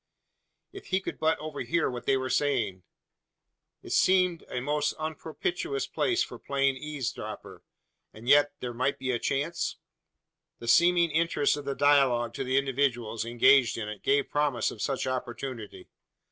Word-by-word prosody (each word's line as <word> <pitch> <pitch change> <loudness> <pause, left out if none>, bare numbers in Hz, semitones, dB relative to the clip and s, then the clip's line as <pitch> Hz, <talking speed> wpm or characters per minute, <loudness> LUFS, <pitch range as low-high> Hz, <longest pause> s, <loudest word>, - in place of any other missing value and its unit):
If 395 - -10
he 190 - +1
could 190 - -6
but 160 +1 +2
overhear 155 +2 -2
what 125 -1 -6
they 135 - +4
were 130 0 -3
saying? 125 -9 0 1.0
It - - -9
seemed 180 -2 +3
a 125 - -3
most 150 +3 0
unpropitious 345 - -3
place 350 -1 0
for - - -9
playing 135 -1 0
eavesdropper; 150 -3 -6 0.5
and 110 +2 -13
yet 145 +1 +5
there 125 -1 -4
might 130 +4 0
be 130 - -2
a 120 - -1
chance? 165 +8 -2 0.8
The 115 - -10
seeming 170 +5 +4
interest 160 -2 +2
of 145 -1 -7
the 140 -1 -2
dialogue 130 -5 +3
to 135 - -3
the 130 +1 0
individuals 125 -5 0
engaged 120 +2 +4
in 110 -2 -4
it 105 -1 -8
gave 140 0 +1
promise 145 -6 +1
of 105 - -9
such 135 -2 -1
opportunity. 125 -3 -5
140 Hz, 155 wpm, -28 LUFS, 125-155 Hz, 1.0 s, yet